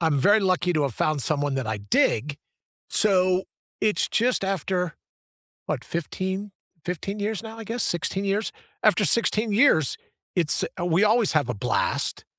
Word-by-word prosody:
I'm 160 -4 +2
very 205 +10 +4
lucky 185 -2 +1
to 155 -3 +1
have 135 -5 -1
found 155 +2 0
someone 145 -1 0
that 135 -3 -2
I 110 -1 -2
dig. 110 +7 +1 0.5
So, 185 -3 +2 0.4
it's 210 -1 +2
just 240 -2 +1
after 185 -2 -2 0.7
what, - - -2
15, 190 +4 -4 0.3
15 180 +4 -4
years 210 0 -2
now, 225 0 -9
I - - -6
guess, 230 +2 -3
16 190 +3 -1
years. 200 +2 -1 0.3
After - - +4
16 225 -1 +2
years, 200 - +3 0.4
it's 170 -4 +1 0.2
we 175 +3 +2
always 220 0 +3
have 155 -5 +2
a 125 - 0
blast. 100 - -1
185 Hz, 155 wpm, -25 LUFS, 155-210 Hz, 0.7 s, very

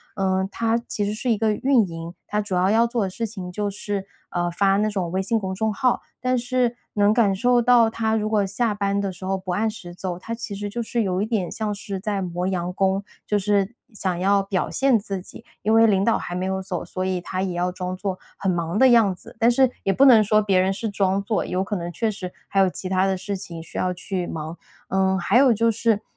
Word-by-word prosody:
呃， 190 -1 +1
他 230 +1 +1
其 205 - -2
实 205 - -1
是 235 +3 -1
一 220 - +2
个 215 -1 +2
运 255 -1 +3
营， 165 0 -7
他 210 - -1
主 205 -3 -3
要 180 +1 +3
要 225 +3 +4
做 235 -3 -1
的 190 - -1
事 230 +5 -3
情 190 -5 -7
就 205 +2 -2
是， 200 -1 -4 0.2
呃， 175 0 -1
发 195 +2 +2
那 215 +1 +1
种 185 -5 -2
微 190 +1 0
信 220 +4 0
公 190 -2 -3
众 220 +2 0
号， 255 0 +1 0.2
但 255 0 +1
是 245 0 0 0.2
能 205 0 +3
感 215 -4 +3
受 245 +4 +3 0.3
他 220 -1 0
如 215 0 0
果 210 -2 +2
下 210 +3 0
班 200 0 0
的 200 -1 -1
时 185 +1 -9
候 195 0 0
不 185 -1 -5
按 215 +5 +1
时 180 -5 -9
走， 180 -1 -4
他 230 +5 -6
其 230 -2 -5
实 205 +1 -4
就 235 +3 -3
是 235 +1 -1
有 185 -1 0
一 - - +1
点 215 -6 -1
像 215 -2 -2
是 200 -1 -5
在 200 0 -2
磨 180 0 -3
洋 180 -2 -1
工。 195 +1 +1 0.2
就 210 - +1
是 205 +2 +1 0.2
想 185 -4 -2
要 195 +1 +3
表 195 -2 -1
现 270 -4 +3
自 195 -2 -5
己， - - -12 0.2
因 220 +2 +2
为 225 0 +6
领 195 -2 +3
导 230 - +3
还 175 - -5
没 185 +1 -2
有 190 0 -1
走， 185 -2 -4
所 185 - -4
以 185 -1 0
他 185 +1 -3
也 190 -2 -2
要 175 +1 0
装 185 0 -4
作 190 -1 -4 0.2
很 190 -2 0
忙 170 +1 -2
的 260 +3 +6
样 225 -6 +5
子。 - - -14
但 230 - +5
是 255 +1 +4
也 195 - +2
不 275 - +5
能 230 -5 +8
说 215 +1 +3
别 195 -3 +2
人 190 +1 +2
是 225 +3 -3
装 195 -1 +1
作， 215 +1 -1
有 185 +1 -1
可 205 +2 -3
能 175 -2 -4
确 220 +6 -1
实 185 -3 -6 0.2
还 195 - +1
有 190 - +5
其 185 - -6
他 185 0 +2
的 190 -1 0
事 200 +2 -4
情 170 -3 -8
需 - - -9
要 180 0 0
去 180 0 -4
忙。 160 +1 -5 0.3
嗯， 190 0 +2
还 195 +6 +2
有 265 -2 +6
就 230 +1 +2
是， 225 -1 +1
200 Hz, 275 characters per minute, -23 LUFS, 185-220 Hz, 0.3 s, 能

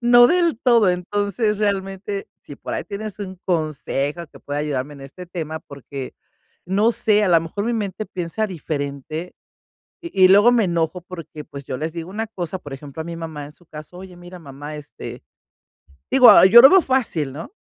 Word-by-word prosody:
no 240 0 +7
del 340 -3 +2
todo. 235 -6 +4
Entonces, 205 +4 -1
realmente, 195 0 -2 0.2
si 145 - -11
por - - -6
ahí - - -2
tienes 215 0 -7
un 190 -2 -6
consejo 155 -2 -2
que - - -17
pueda 145 0 -4
ayudarme 145 -1 -3
en 140 - -12
este 160 +7 -10
tema, 160 -3 -5
porque 140 -1 -9 0.5
no 205 +5 +2
sé, 210 -2 +2
a - - +1
la 170 -2 +6
mejor 165 +5 -4
mi 235 - 0
mente 205 -1 -3
piensa 180 +4 -3
diferente, 155 0 -5 0.7
y 265 - +3
y - - +9
luego 205 +5 +7
me 235 -4 +3
enojo 170 0 -1
porque, 165 -4 -9
pues, 140 -1 -10
yo 130 - -4
les 155 +1 -3
digo 170 0 -6
una 220 +2 -3
cosa, 185 -3 -5
por 145 -6 -10
ejemplo, 140 +3 -8
a 160 - -7
mi 170 - -6
mamá, 160 -3 -7
en 145 - -13
su 175 - -24
caso: 155 +3 -11
"Oye, 185 -1 -11
mira, 175 +1 -11
mamá, 145 0 -9
este" 145 -1 -10 0.9
digo, 255 -1 +8
ah, - - +8
yo 230 +5 +9
lo 270 - +10
veo 380 -1 +6
fácil, 220 - -1
¿no? 160 - -9
180 Hz, 195 wpm, -21 LUFS, 150-205 Hz, 0.9 s, lo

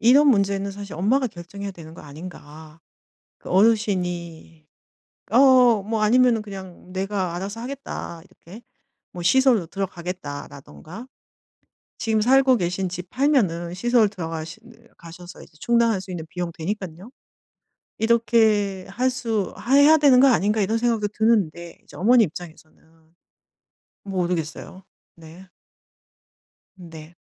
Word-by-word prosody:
이런 270 +6 +5
문제는 200 -4 +1
사실 200 0 -9
엄마가 245 - +1
결정해야 200 +1 -8
되는 160 -3 -12
거 - - -12
아닌가. 155 0 -12 0.6
그 - - -11
어르신이 180 -6 0 0.7
어 250 -3 +5
뭐 220 +1 -2
아니면은 235 +1 +3
그냥 190 -3 -11
"내가 190 -2 -2
알아서 200 +5 -6
하겠다." 250 -9 -7
이렇게 195 +3 -15 0.5
뭐 175 - -8
"시설로 245 -2 +3
들어가겠다."라든가. 175 - -7 0.9
지금 220 -2 0
살고 260 +3 +4
계신 180 0 -2
집 180 0 -7
팔면은 205 - 0
시설 235 +1 +2
들어가시는 170 +5 -8
가셔서 175 +2 -12
이제 - - -19
충당할 235 -4 +2
수 190 0 -10
있는 170 -3 -6
비용 175 -1 -4
되니깐요. 190 +3 -6 0.9
'이렇게 220 -4 +2
할 255 +2 0
수 225 -6 -3
하 255 +5 0
해야 295 +3 +7
되는 280 -4 +5
거 275 - +6
아닌가.' 215 -3 +2
이런 220 +3 0
생각도 225 -3 0
드는데 175 -7 0
이제 - - -17
어머니 235 +5 +5
입장에서는 160 -1 -11 1.3
모르겠어요. 180 -1 -4 0.3
네. 170 +3 -15 1.3
네. 165 -2 -12
195 Hz, 285 characters per minute, -22 LUFS, 175-230 Hz, 1.3 s, 해야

